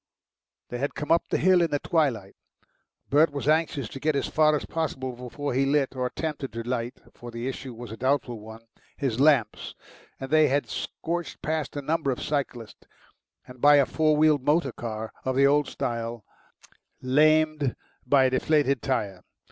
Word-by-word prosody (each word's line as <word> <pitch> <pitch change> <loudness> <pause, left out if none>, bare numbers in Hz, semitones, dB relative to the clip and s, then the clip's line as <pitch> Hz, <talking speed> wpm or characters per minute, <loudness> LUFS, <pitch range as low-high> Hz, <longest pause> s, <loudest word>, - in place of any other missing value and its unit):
They 120 - -5
had 140 +2 -2
come 150 - -4
up 170 - +4
the - - +1
hill 185 -1 +4
in 170 - +2
the 145 - 0
twilight; 135 - -1 0.8
Bert 150 +2 +5
was 140 -1 -5
anxious 155 -5 +1
to 135 - -8
get 155 +1 0
as 140 - 0
far 155 -1 +3
as 145 - -3
possible 130 -6 -3
before 125 +3 -5
he 135 +2 +2
lit 135 -1 +1
or 125 -1 -1
attempted 150 -1 -4
to 115 0 -4
light, 120 0 -3
for 120 - -10
the 115 +1 -5
issue 130 -2 -6
was 120 -1 -9
a 110 - -7
doubtful 130 -2 0
one 110 +1 -11 0.4
his 130 -5 -2
lamps, 140 -7 +2 0.4
and 135 +1 -7
they 155 -1 +5
had 140 +2 0
scorched 170 0 -4
past 155 -1 -2
a 145 - -4
number 155 0 0
of 125 - -1
cyclists, 130 -6 -4 0.6
and 125 -1 -14
by 145 +1 +7
a 140 -2 +5
four 155 +1 +1
wheeled 155 -2 +4
motor 145 -1 +2
car 110 -2 -6
of 130 0 -1
the 135 +1 +5
old 145 +1 +3
style 115 -2 -4 0.8
lamed 155 +1 +3 0.3
by 135 +1 +4
a 130 - +2
deflated 140 -1 +2
tyre. 105 -9 -2
140 Hz, 180 wpm, -26 LUFS, 125-150 Hz, 0.8 s, by